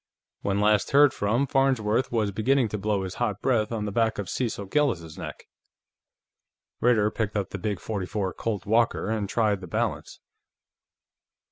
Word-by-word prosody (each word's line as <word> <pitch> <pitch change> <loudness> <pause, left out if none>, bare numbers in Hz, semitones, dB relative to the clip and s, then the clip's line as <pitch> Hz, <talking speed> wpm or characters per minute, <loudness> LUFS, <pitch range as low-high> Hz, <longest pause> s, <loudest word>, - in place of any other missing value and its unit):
When 100 0 0
last 105 +1 +2
heard 145 0 +6
from, 115 +7 +1
Farnsworth 130 -4 +1
was 110 -4 0
beginning 120 +4 +2
to 105 - -4
blow 100 -1 0
his 95 -1 -5
hot 105 -5 0
breath 110 -3 +1
on 110 -2 -2
the 105 - -3
back 110 +1 +1
of 100 -3 -4
Cecil 115 -5 -2
Gillis's 95 - 0
neck." - - -8 1.3
Ritter 110 -3 +3
picked 110 -2 -3
up 100 - -2
the - - -5
big 105 -2 -2
.44 100 -1 -3
Colt 105 -6 -3
Walker 110 -1 +1
and 105 -3 -2
tried 105 -4 +1
the 90 - -8
balance. - - -3
105 Hz, 160 wpm, -26 LUFS, 100-120 Hz, 1.3 s, heard